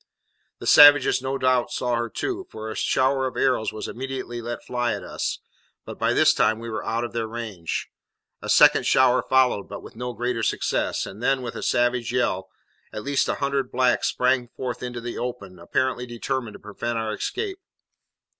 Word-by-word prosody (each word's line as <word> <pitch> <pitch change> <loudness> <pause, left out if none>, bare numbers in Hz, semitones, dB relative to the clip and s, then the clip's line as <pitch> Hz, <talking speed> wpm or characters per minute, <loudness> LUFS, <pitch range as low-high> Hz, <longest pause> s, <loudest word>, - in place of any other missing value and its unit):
The - - -9
savages 145 -3 +7
no 135 +1 -2
doubt 130 -2 +2
saw 125 -1 -2
her 120 0 -2
too, 375 - -4
for 110 0 -7
a - - -6
shower 130 0 +1
of 130 - -7
arrows 125 -4 +1
was 110 - -6
immediately 130 -2 -5
let 120 +1 -6
fly 120 -1 -1
at - - -7
us; - - -3 0.5
but - - -9
by - - +2
this - - +5
time 110 - +2
we 115 0 -7
were 110 -1 -4
out 115 +2 -1
of 120 - -5
their 115 -1 -2
range. 110 -7 -4 0.5
A - - -7
second - - +6
shower 130 -1 +4
followed, 130 -6 +2
but 100 - -8
with - - -12
no 125 +1 -5
greater 120 +1 -2
success; - - -1
and 100 +4 -10
then, 135 +1 +1
with 120 - -5
a - - -5
savage 120 -1 +1
yell, 95 -7 -1 0.4
at 105 - -6
least 140 -1 0
a - - +1
hundred 140 -2 -1
blacks 125 -1 +2
sprang 125 -1 +1
forth 125 0 -6
into 125 -1 -5
the 120 0 -5
open, 100 -7 -6
apparently 125 +8 -1
determined 120 -1 -4
to - - -11
prevent 115 +3 -4
our 110 -1 -2
escape. 390 - -4
120 Hz, 190 wpm, -24 LUFS, 115-130 Hz, 0.5 s, savages